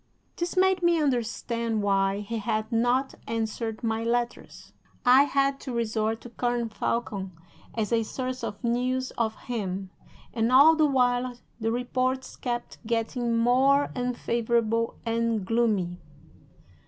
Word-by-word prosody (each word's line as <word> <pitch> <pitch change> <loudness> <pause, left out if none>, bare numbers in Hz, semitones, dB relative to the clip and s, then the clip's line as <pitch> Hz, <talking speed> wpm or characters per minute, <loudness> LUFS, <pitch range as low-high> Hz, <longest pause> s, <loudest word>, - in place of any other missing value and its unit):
"This 345 +2 -3
made 380 0 +4
me 345 -1 +3
understand 235 -4 -1
why 195 0 +1
he 225 +2 -4
had 215 +1 -2
not 245 +4 +1
answered 225 0 -3
my 225 0 0
letters. 240 +1 -3 0.3
I 255 +3 +7
had 275 -1 +1
to 260 - -6
resort 225 -1 -1
to 240 - -11
Colonel 240 -1 -1
Falcon 205 -3 -2 0.4
as 220 0 -1
a 230 - +3
source 255 +2 -4
of 210 -1 -5
news 255 +2 0
of 220 -2 -1
him, 195 -5 -4 0.4
and 230 +1 +1
all 290 +5 +8
the 310 -1 +4
while 250 -2 +1 0.2
the 225 0 0
reports 255 +2 -1
kept 240 -1 -4
getting 230 +1 0
more 265 +4 +3
unfavorable 235 -2 0
and 230 -3 0
gloomy. 205 -5 +1
235 Hz, 130 wpm, -27 LUFS, 225-255 Hz, 0.4 s, all